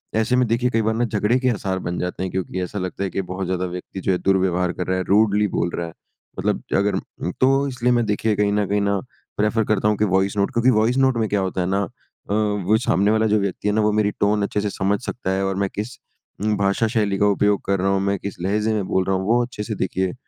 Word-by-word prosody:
ऐसे 110 +3 +2
में 125 -1 +3
देखिए 120 +2 +1
कई 115 -2 +1
बार 110 - +2
ना 120 - +1
झगड़े 110 +2 +1
के 130 - +1
आसार 95 -5 -2
बन 90 +1 -2
जाते 90 +1 -3
हैं 95 - -3
क्योंकि 95 0 -3
ऐसा 95 +3 -4
लगता 95 +1 -4
है 95 - -1
कि 95 - -2
बहुत 95 +1 -3
ज़्यादा 95 0 -1
व्यक्ति 90 +1 -6
जो 95 - +1
है 90 - +2
दुर्व्यवहार 90 -2 +1
कर 90 - -4
रहा 95 - +1
है, 95 - -1
रूडली 105 +1 +3
बोल 85 - 0
रहा 85 - -3
है। 80 - -10 0.5
मतलब - - 0 0.2
अगर 100 -1 +1
अ, 90 -1 -5
तो 135 +2 +4
इसलिए 125 -2 0
मैं 120 -1 +2
देखिए 105 +1 0
कहीं 100 0 +1
ना 105 - +2
वहीं 100 +1 0
ना 100 -1 +1 0.4
प्रेफर 105 +2 +2
करता 105 0 +2
हूँ 105 - +2
कि 105 - +2
वॉइस 95 +2 +1
नोट 100 +5 +1
क्योंकि 120 +2 +3
वॉइस 120 +4 +2
नोट 130 -2 +3
में 110 - +1
क्या 100 - +1
होता 95 0 -2
है 90 - -1
ना 100 +1 +1
अ, 90 - -5 0.4
वो 105 -1 +1
सामने 100 +5 +3
वाला 110 0 +2
जो 105 0 +3
व्यक्ति 100 +1 -2
है 105 - +2
ना 110 - +3
वो 105 - +3
मेरी 105 0 +1
टोन 105 0 +2
अच्छे 105 +1 -1
से 105 - -1
समझ 100 +1 0
सकता 95 -6 -3
है 95 +1 0
और 95 - -1
मैं - - -3
किस 110 +5 -5 0.5
उम 105 0 +2
भाषा 100 +3 +1
शैली 105 -4 0
का 105 - +3
उपयोग 105 -1 +2
कर 100 -1 +1
रहा 95 - +1
हूँ 95 - +2
मैं 100 0 0
किस 100 - -6
लहज़े 105 +4 0
में 105 -3 -1
बोल 95 - +1
रहा 95 0 +1
हूँ 95 - -2
वो 120 +2 +4
अच्छे 120 -4 -6
से 110 0 -4
देखिए 95 -1 -1
100 Hz, 275 wpm, -22 LUFS, 95-110 Hz, 0.5 s, तो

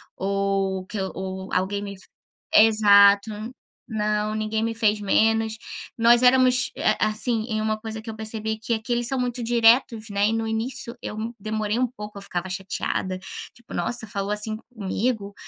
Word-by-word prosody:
ou 195 -1 -1
que 215 - -7
o 190 0 -5
alguém 195 +2 0
me 200 -1 -7 0.6
exato. 205 -2 +6 0.6
Não, 210 -1 -1
ninguém 215 0 -1
me 230 0 -1
fez 215 -2 +2
menos. 220 +2 +2 0.4
Nós 235 +1 +5
éramos, 255 0 +5
eh, - - +1
assim, 215 +1 0
em 215 -1 -1
uma 215 0 0
coisa 220 0 -6
que 225 - -9
eu 220 - -6
percebi 220 0 -3
que 225 +2 -2
aqui 225 +2 -3
eles 240 0 +1
são 265 +1 0
muito 245 -1 -2
diretos, 230 -1 +3
né, 200 0 +1
e - - -1
no 225 0 -1
início 235 +2 -3
eu 220 +3 -5
demorei 215 +1 -2
um 255 - +3
pouco, 210 -4 -10
eu - - -8
ficava 185 -1 -4
chateada, 185 0 -3 0.3
tipo 235 -1 -14
"Nossa, 220 +6 -1
falou 200 -1 -3
assim 210 +1 +1 0.2
comigo". 205 0 -2
215 Hz, 165 wpm, -24 LUFS, 200-230 Hz, 0.6 s, exato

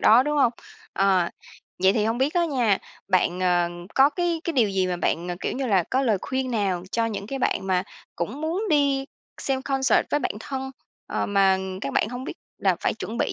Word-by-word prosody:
đó, 230 +4 +7
đúng 295 +2 -1
hông? 250 -5 +4 0.4
Ờ, 190 -3 +3 0.5
vậy 190 +1 +6
thì 210 0 +1
hông 225 +2 0
biết 275 +5 +1
á 350 -1 +3
nha, 245 - +2 0.3
bạn, 185 -1 +2
ờ, 175 -1 +2 0.3
có 270 +2 +6
cái 345 -1 -1
cái 335 - -1
điều 240 -8 +3
gì 190 -1 +1
mà 180 -1 -1
bạn, 175 0 -1
ờ, 175 - -2
kiểu - - -2
như 265 0 -2
là, 195 -6 +3
có 260 +1 +2
lời 220 -7 +2
khuyên 260 0 -2
nào 195 -6 0
cho 230 0 +1
những 205 -3 -4
cái 270 +4 -4
bạn 195 - 0
mà 185 -1 +2 0.3
cũng 210 - -3
muốn 335 +7 -1
đi 280 -2 +3 0.4
xem 265 -1 -1
concert 270 -1 +2
với 295 - +2
bạn - - -1
thân, 265 +2 -4 0.4
ờ, - - -2
mà 195 -1 +3 0.2
các 140 - -3
bạn - - +2
hông 245 +2 -6
biết - - -5 0.2
là - - +2
phải - - 0
chuẩn - - -6
bị - - 0
230 Hz, 225 wpm, -25 LUFS, 190-270 Hz, 0.5 s, đó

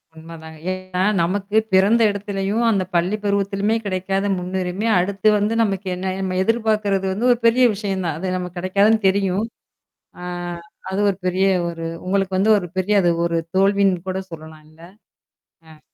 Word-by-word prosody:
உண்மை 165 +1 -11
தாங்க. 160 0 -11
ஏன்னா 185 0 -4 0.2
நமக்கு 200 +4 -1 0.2
பிறந்த 205 +5 +4
இடத்துலயும், 205 +2 -2
அந்த 195 -4 +1
பள்ளி 180 +5 +1
பருவத்திலயுமே 200 +1 0
கிடைக்காத 195 +1 -1
முன்னுரிமை, 185 +3 -3
அடுத்து 195 +3 -1
வந்து 210 +2 0
நமக்கு 195 -2 -2
என்ன 185 +1 -3
நம்ம 185 -1 -2
எதிர்பார்கிறது 215 -3 0
வந்து 235 +6 0
ஒரு 240 - +3
பெரிய 245 +2 +5
விஷயம் 195 -2 -3
தான். 160 -2 -2
அது 185 0 -2
நமக்கு 180 0 -6
கிடைக்காதுன்னு 200 +3 +2
தெரியும். 195 +2 0 0.8
ஆ - - -7 0.7
அது 190 - -2
ஒரு 190 - -2
பெரிய 185 +2 +1 0.2
ஒரு 165 -1 -6 0.2
உங்களுக்கு 195 0 0
வந்து 210 +3 +3
ஒரு 180 - -6
பெரிய 195 +3 +1
அது 175 - +2 0.2
ஒரு 170 -1 0 0.2
தோல்வின்னு 195 -2 +2
கூட 185 - -2
சொல்லலாம் 155 -1 -11
இல்ல? 155 +1 -20 0.9
அ. 155 -1 -16
190 Hz, 160 wpm, -21 LUFS, 180-205 Hz, 0.9 s, பெரிய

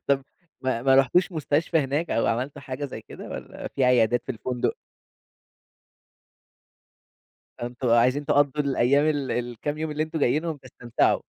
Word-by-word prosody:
طَب 140 -1 +2 0.4
ما 130 -3 -1
ما 135 0 +5
رُحتوش 135 +8 +3
مستشفى 160 +1 +1
هناك 145 +4 -1
أو 115 - +1
عملتوا 135 +5 -2
حاجة 130 +2 -5
زي 135 - -6
كده - - -10
والّا - - -7
في 135 - 0
عيادات 120 -1 +3
في - - -3
الفندق؟ 125 +1 -2 2.8
فأنتم 120 +1 -3
عايزين 125 +5 +3
تقضّوا 145 +1 +2
الأيام، 140 +1 +3
ال 145 -3 0
الكام 120 +5 -3
يوم 155 0 -3
اللي 150 +1 0
أنتم 160 0 -4
جايينهم 155 +4 +1
تستمتعوا. 125 -3 0
135 Hz, 145 wpm, -25 LUFS, 125-150 Hz, 2.8 s, ما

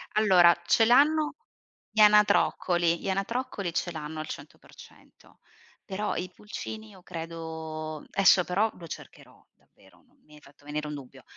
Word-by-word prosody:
Allora 185 -5 +6
ce 225 +5 +4
l'hanno 300 +5 +4 0.5
gli 215 0 +1
anatroccoli. 180 -5 +4
Gli - - -4
anatroccoli 195 -2 -3
ce 175 - -2
l'hanno 155 -1 -6
al 155 - -5
100%; - - -14 0.5
però 205 +2 -3
i 180 +1 -4
pulcini 215 +1 -8
io 190 -3 -16
credo 160 -2 -7
esso 190 -2 +5
però 195 +6 +1
lo 170 -2 -10
cercherò - - -12
davvero, - - -25
n - - -32
mi 150 0 -18
hai 150 - -17
fatto 145 0 -21
venire 150 +1 -4
un 150 - -5
dubbio. 135 -2 -12
175 Hz, 150 wpm, -27 LUFS, 155-210 Hz, 0.5 s, Allora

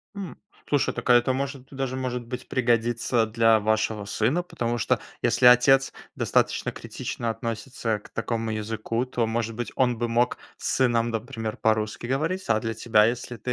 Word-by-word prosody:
М, 195 -3 -6 0.3
слушай 145 -2 +1
так, - - -5
а - - +8
это 120 +1 +4
может, 135 0 -4
даже 135 -2 -3
может 125 -2 -3
быть 125 +1 -7
пригодится 120 -1 +1
для 115 0 +4
вашего 110 0 0
сына 120 +12 0
потому 120 -8 -2
что 110 - +1 0.2
если - - +2
отец 130 +2 +6 0.2
достаточно - - +1
критично 115 - -5
относится 115 0 -3
к - - -16
такому 115 -1 -2
языку, 110 +2 -2
то 125 -2 -1
может 115 0 -2
быть 120 +1 -4
он 125 -2 +2
бы 120 0 -1
мог 120 +1 +1 0.2
с - - -5
сыном 120 -3 +2
например 115 -1 -4
по-русски 110 +1 0
говорить. 160 +9 -1
А 110 - +3
для 115 0 -3
тебя 110 -1 +3
если 120 0 -3
120 Hz, 170 wpm, -25 LUFS, 110-125 Hz, 0.3 s, а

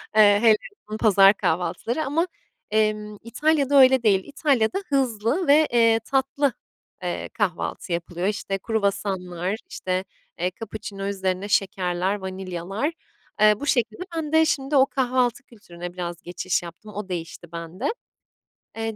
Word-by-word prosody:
Eee, 205 -1 +7
hele 225 -2 +7 0.3
o 215 - -3
pazar 200 -3 +6
kahvaltıları 205 - -1
ama, 325 +6 +1 0.4
emm, 215 -1 0
İtalya'da 285 +4 +2
öyle 260 -1 +5
değil. 195 -4 +3
İtalya'da 285 - +1
hızlı 265 - 0
ve, 300 +2 +6
eee, 230 -1 +5
tatlı, 275 +1 +1 0.5
eee, 175 -1 -3
kahvaltı 185 -2 -2
yapılıyor. 175 +2 -2
İşte, 200 -1 -2
kruvasanlar, 195 -3 -2
işte, 185 0 -2 0.4
eee, 180 +2 0
kapuçino 200 -1 -6
üzerine 190 -1 -2
şekerler, 185 -1 0
vanilyalar, 190 - -4 0.5
eee, 215 0 +7
bu 285 - -4
şekilde. 235 -2 0 0.2
Ben 310 -2 -3
de 320 0 +5
şimdi 290 -3 0
o 265 -1 +7
kahvaltı 255 -1 0
kültürüne 175 -7 -10
biraz 175 -1 -5
geçiş 175 +1 -2
yaptım. 175 +5 -11
O 205 -2 -5
değişti 170 -1 -6
bende. 170 - -4 0.8
Eee, 225 -1 -3
210 Hz, 135 wpm, -24 LUFS, 185-255 Hz, 0.8 s, Eee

